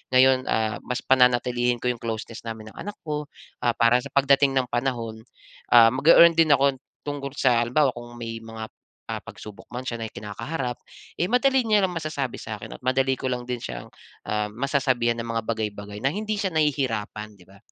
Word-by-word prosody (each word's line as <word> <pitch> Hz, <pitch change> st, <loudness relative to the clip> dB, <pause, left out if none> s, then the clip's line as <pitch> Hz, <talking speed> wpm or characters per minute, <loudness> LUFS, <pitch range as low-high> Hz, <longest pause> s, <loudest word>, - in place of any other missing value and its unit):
ngayon, 130 Hz, 0 st, +5 dB
ah, 110 Hz, -1 st, 0 dB
mas 125 Hz, 0 st, -3 dB
pananatilihin 125 Hz, -1 st, +2 dB
ko 125 Hz, -, +2 dB
yung 120 Hz, -, -7 dB
closeness 115 Hz, 0 st, -5 dB
namin 110 Hz, -1 st, -7 dB
ng -, -, -20 dB
anak 205 Hz, +1 st, -6 dB
ko. 150 Hz, -1 st, -4 dB, 0.3 s
Ah, 120 Hz, -1 st, +1 dB
para 115 Hz, +1 st, +4 dB
sa 140 Hz, -, -7 dB
pagdating 140 Hz, 0 st, +4 dB
ng 130 Hz, -2 st, +1 dB
panahon, 120 Hz, -3 st, -2 dB, 0.5 s
ah, 115 Hz, -1 st, +8 dB
mag-e-earn 165 Hz, +5 st, +7 dB
din 155 Hz, -3 st, +5 dB
ako 140 Hz, 0 st, +2 dB, 0.3 s
tungkol 140 Hz, -1 st, -4 dB
sa 125 Hz, -4 st, +3 dB
halimbawa 130 Hz, +3 st, +2 dB
kung 120 Hz, 0 st, -10 dB
may 115 Hz, -1 st, -5 dB
mga, 110 Hz, 0 st, -7 dB, 0.4 s
ah, -, -, -2 dB
pagsubok 105 Hz, -1 st, -11 dB
man 125 Hz, -, -3 dB
siya 115 Hz, -, -2 dB
na 115 Hz, -, -3 dB
kinakaharap. 120 Hz, +5 st, -5 dB, 0.4 s
Eh, -, -, +1 dB
madali 265 Hz, +1 st, +3 dB
niya 210 Hz, -2 st, +4 dB
lang 180 Hz, -, -4 dB
masasabi 140 Hz, -5 st, -3 dB
sa 110 Hz, -2 st, -6 dB
akin -, -, -8 dB
at -, -, -35 dB
madali 130 Hz, +1 st, +2 dB
ko -, -, -5 dB
lang 125 Hz, 0 st, -2 dB
din 125 Hz, -1 st, -2 dB
siyang, -, -, -6 dB, 0.4 s
um, 105 Hz, 0 st, -1 dB
masasabihan 125 Hz, -3 st, +1 dB
ng 115 Hz, -, -4 dB
mga 115 Hz, 0 st, -1 dB
bagay-bagay 105 Hz, -2 st, -4 dB
na 135 Hz, -, +3 dB
hindi 215 Hz, +2 st, -2 dB
siya 195 Hz, -2 st, -1 dB
nahihirapan. 115 Hz, -8 st, -1 dB
'Di 90 Hz, -, -19 dB
ba? 100 Hz, -, -17 dB
125 Hz, 195 wpm, -25 LUFS, 115-140 Hz, 0.5 s, ah